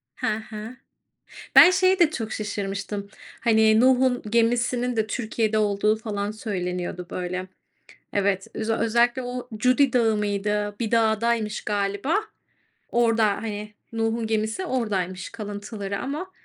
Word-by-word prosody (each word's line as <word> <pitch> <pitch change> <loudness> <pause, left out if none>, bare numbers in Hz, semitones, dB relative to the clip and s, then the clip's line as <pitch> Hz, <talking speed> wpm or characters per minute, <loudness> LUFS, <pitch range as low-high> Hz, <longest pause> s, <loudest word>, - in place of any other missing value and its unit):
Hı - - -3 0.2
hı. 220 +3 -7 0.8
Ben 365 - +10
şeye 375 0 +3
de 325 -3 +5
çok 225 -7 -4
şaşırmıştım. 200 -1 -4 0.3
Hani, 220 -1 +4
Nuh'un 255 -1 +4
gemisinin 240 +1 +1
de 220 -1 0
Türkiye'de 220 -1 -1
olduğu 210 0 +2
falan 210 -2 -3
söyleniyordu, 180 -4 -4
böyle. 185 +1 -4 0.7
Evet, 195 -1 0
öze 225 0 -1
özellikle 240 +3 +2
o 245 0 -6
Cudi 255 +3 +3
Dağı 225 -3 +3
mıydı? 205 0 -1
Bir 225 -2 -2
dağdaymış 225 -1 +1
galiba. 205 - -1 0.7
Orada, 230 -2 +3
hani, 210 0 -4 0.2
Nuh'un 225 0 -1
gemisi 220 - -1
oradaymış 195 - -2
kalıntıları 205 -1 -5
ama 310 +8 -4
220 Hz, 120 wpm, -24 LUFS, 205-240 Hz, 0.8 s, Ben